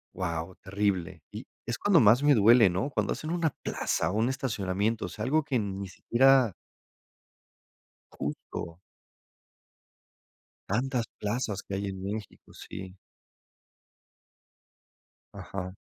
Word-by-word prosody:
Guau, 85 0 -3
terrible. 100 -3 -1
Y - - -7 0.2
es 120 - -2
cuando 200 -5 +4
más 120 +3 +6
me 145 -1 +6
duele, 110 -1 +7
¿no?, 125 +11 -1
cuando - - 0
hacen 155 - -6
una 170 -3 +1
plaza - - -1
o - - -4
un 110 +3 +2
estacionamiento, 110 -4 -1
o - - -7
sea, 110 - -5
algo 155 +5 +2
que 140 -4 0
ni 100 -2 -3
siquiera 130 0 +4 1.6
Justo. 80 +3 -5 1.9
Tantas 125 +2 0
plazas 105 -2 -2
que 100 - -6
hay 100 +1 -2
en 95 -1 -6
México, 105 +2 -7
sí. 95 0 -9 2.4
Ajá. 95 -1 -6
105 Hz, 115 wpm, -29 LUFS, 95-130 Hz, 2.4 s, duele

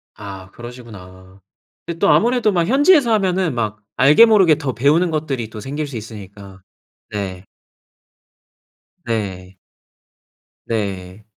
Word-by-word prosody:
아 95 -2 -9
그러시구나. 100 -6 -12 0.4
그 170 -1 -5
또 200 - +3
아무래도 235 -1 +3
막 170 -3 0
현지에서 285 - +4
하면은 185 - 0
막 105 -3 -3 0.2
알게 145 - +7
모르게 190 -9 +5
더 140 -5 -3
배우는 150 +9 +2
것들이 140 -8 -3
또 110 - -9
생길 145 +6 -4
수 135 -4 -7
있으니까. 100 -3 -11 0.5
네. 95 -3 -5 1.6
네. 95 -5 -4 1.1
네. 100 -2 -4
120 Hz, 230 characters per minute, -19 LUFS, -, 1.6 s, 알게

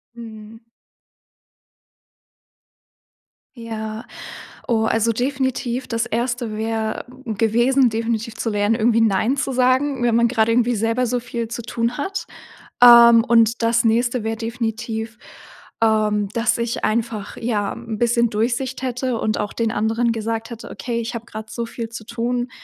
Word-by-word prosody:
Mhm. 225 -1 -11 2.9
Ja, 220 -2 -6 0.6
Oh, 225 -2 +2
also 225 +1 +2
definitiv, 260 0 -2
das 230 -1 -1
1. 240 -1 -2
wäre, 220 0 -2 0.2
hm, 220 -4 -4
gewesen, 240 +4 +3
definitiv 225 0 -2
zu 230 - -2
lernen, 205 +1 +1
irgendwie 230 0 +2
nein 220 +5 +2
zu 270 -1 -2
sagen, 255 +1 +1
wenn 235 -1 +2
man 235 0 +3
gerade 225 -2 +2
irgendwie 245 0 +2
selber 225 +3 0
so 245 +1 -1
viel 235 -1 -5
zu 235 +1 -5
tun 230 +2 -2
hat. 385 +7 -4 0.6
Ähm, 235 -1 +9
und 230 0 +3
das 230 0 +2
nächste 235 +1 +1
wäre 225 0 -1
definitiv, 225 -1 -4 0.6
ähm, 215 -2 +2
dass 230 +1 +1
ich 235 0 -3
einfach, 220 -2 -2
ja, 215 -4 -1
'n 230 -2 -6
bisschen 235 0 +2
Durchsicht 240 +5 -1
hätte 255 -1 -2
und 215 -1 -1
auch 210 -1 -3
den 225 -1 -1
anderen 225 +3 0
gesagt 225 0 -3
hätte: 235 -1 -9
„Okay, 230 +4 -4
ich 235 +1 -4
habe 230 - -6
gerade 220 -1 -8
so 235 0 -4
viel 230 0 -6
zu 230 -1 -9
tun. 240 +2 -2
230 Hz, 150 wpm, -21 LUFS, 220-240 Hz, 2.9 s, Ähm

